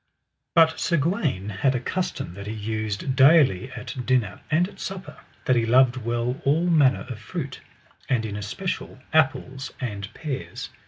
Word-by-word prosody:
But 160 -1 +5
Sir 170 - +1
Gawaine 145 - 0
had 130 +7 +1
a - - +1
custom 150 - -3
that 100 +2 -8
he 105 - -3
used 110 +3 -3
daily 135 - +5
at 125 +1 -6
dinner 125 -4 0
and 165 +4 +3
at 205 - -15
supper, 190 0 -6 0.3
that 130 - +3
he 120 - +3
loved 125 +2 +5
well 120 +1 -2
all 155 +5 +2
manner 150 -7 +4
of 125 -5 -6
fruit, 140 +3 -6 0.5
and 115 -3 +1
in 105 -2 -4
especial 105 - -4 0.2
apples 135 -3 +1
and 100 -6 -4
pears. 140 -4 -5
130 Hz, 160 wpm, -25 LUFS, 110-155 Hz, 0.5 s, But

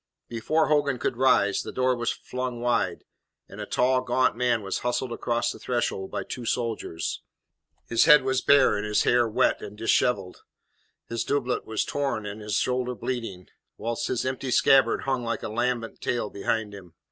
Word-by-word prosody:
Before 155 +8 0
Hogan 145 -3 +2
could 125 - -2
rise, 115 -6 +3
the - - -7
door 130 0 +1
was 120 -1 -2
flung 125 -1 -5
wide, 120 0 0 0.4
and - - -9
a - - -6
tall, 130 +1 +2
gaunt 130 0 +1
man 120 -3 +1
was 95 - -2
hustled 125 +1 -2
across 120 0 -1
the - - -10
threshold 120 -6 -2
by - - -4
two 125 - -7
soldiers. 115 -8 -3 0.6
His 115 - +3
head 150 -4 +7
was 130 -1 0
bare, 135 -6 +5
and 105 - -3
his 105 0 +1
hair 120 -1 +3
wet 125 +4 +1
and 105 - -9
dishevelled. 110 -3 0 0.7
His 115 0 -2
doublet 130 -3 -1
was 110 -1 -1
torn 135 -7 -2
and 105 +1 -6
his 105 -1 -3
shoulder 125 0 0
bleeding, 115 -6 -5 0.3
whilst 115 +2 -3
his 125 -1 -1
empty 130 0 -3
scabbard 125 0 +4
hung 130 -2 -1
like 115 0 -3
a - - -3
lambent 120 +1 -2
tail 120 -4 -2
behind 105 +1 -2
him. 90 -4 -12
120 Hz, 180 wpm, -26 LUFS, 110-130 Hz, 0.7 s, head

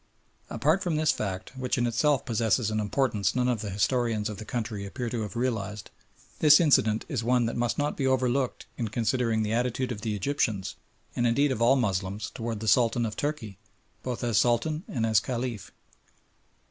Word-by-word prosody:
Apart 155 +7 +1
from 175 -5 -1
this 155 0 +3
fact, 95 +4 -4
which 130 -1 -2
in 120 - +1
itself 125 +3 +1
possesses 115 -1 +1
an 110 - 0
importance 105 -3 0
none 125 0 +1
of 120 -4 0
the 105 - -4
historians 110 +1 0
of 105 - -6
the 110 - -8
country 110 -3 -4
appear 120 +4 -5
to 120 - -2
have 105 -3 -5
realised, 110 -5 -3 0.5
this 150 -1 +7
incident 110 -9 +3
is 135 -8 -2
one 125 0 +2
that 115 - -2
must 120 0 -1
not 145 0 -1
be 135 - 0
overlooked 130 0 0
in 115 - -1
considering 115 0 0
the 105 +1 -1
attitude 125 +2 -1
of 105 -3 -5
the 110 -2 -2
Egyptians, 105 -4 -1 0.4
and 120 - +2
indeed 140 +4 +2
of 115 - -2
all 120 +3 +5
Moslems, 100 -3 -2
towards 115 -3 -4
the 110 - -4
Sultan 120 +1 +3
of 105 -2 -4
Turkey 115 -10 -4 0.4
both 125 -2 -4
as 115 -3 +2
Sultan 140 +7 +1
and 115 -3 -1
as 110 -2 +4
Caliph. 120 -3 -4
120 Hz, 190 wpm, -27 LUFS, 110-130 Hz, 0.5 s, this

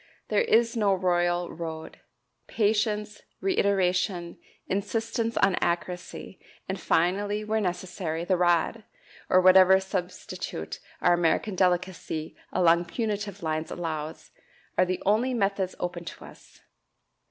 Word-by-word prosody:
There - - +3
is 235 - +3
no 205 -4 +3
royal 175 -1 +1
road 160 -1 -7 0.5
patience, 210 -1 0 0.2
reiteration, 185 - 0 0.3
insistence 225 +3 -2
on 195 -1 +4
accuracy, 175 +2 -3 0.3
and 190 0 -3
finally, 205 +5 +1
where 215 +1 0
necessary, 180 -3 -3
the 185 - +2
rod, 175 +5 +2 0.5
or 185 - +6
whatever 185 +1 +7
substitute 185 - -5 0.2
our 175 - +5
American 175 +4 +1
delicacy 180 -3 -1 0.2
along 170 0 +4
punitive 205 -1 -3
lines 155 0 -2
allows, 160 -2 -5 0.4
are 185 - +4
the 185 0 -3
only 230 +6 +2
methods 195 -3 0
open 175 -1 -3
to - - -9
us. - - -16
185 Hz, 115 wpm, -27 LUFS, 175-205 Hz, 0.5 s, whatever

